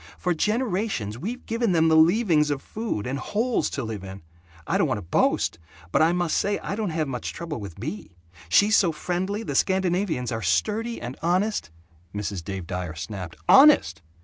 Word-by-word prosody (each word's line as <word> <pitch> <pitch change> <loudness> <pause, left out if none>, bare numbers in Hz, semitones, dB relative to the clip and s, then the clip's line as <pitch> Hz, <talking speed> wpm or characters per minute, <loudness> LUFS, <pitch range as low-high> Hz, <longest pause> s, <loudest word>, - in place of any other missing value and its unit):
For 180 - 0
generations 195 - -1
we've 230 - -5
given 230 -3 0
them 165 -1 +4
the 160 - +4
leavings 160 -2 +4
of 140 -2 -2
food, 215 - -4
and 135 +3 -3
holes 230 - 0
to 135 - -4
live 110 -4 -5
in. 95 -2 -9 0.4
I - - 0
don't - - +3
want - - -1
to 105 - -7
boast, 85 -1 +1 0.3
but - - +3
I 160 +2 +5
must 175 -2 0
say 205 0 +1
I - - -5
don't 215 -2 -2
have 160 -2 -1
much 125 -3 -4
trouble 165 -6 -5
with 100 -5 -9
Bea. 90 - -7 0.3
She's 210 - +5
so 185 -6 +4
friendly. 185 +7 -3
The - - -4
Scandinavians 180 -8 +1
are 110 -1 -3
sturdy 215 - 0
and 125 +3 -7
honest 185 - 0 0.2
" 85 +3 -23
Mrs. 100 -3 -4
Dave 95 0 -5
Dyer 90 -2 -4
snapped, 85 +2 -6
"Honest? 280 - +6
160 Hz, 190 wpm, -25 LUFS, -, 0.4 s, Honest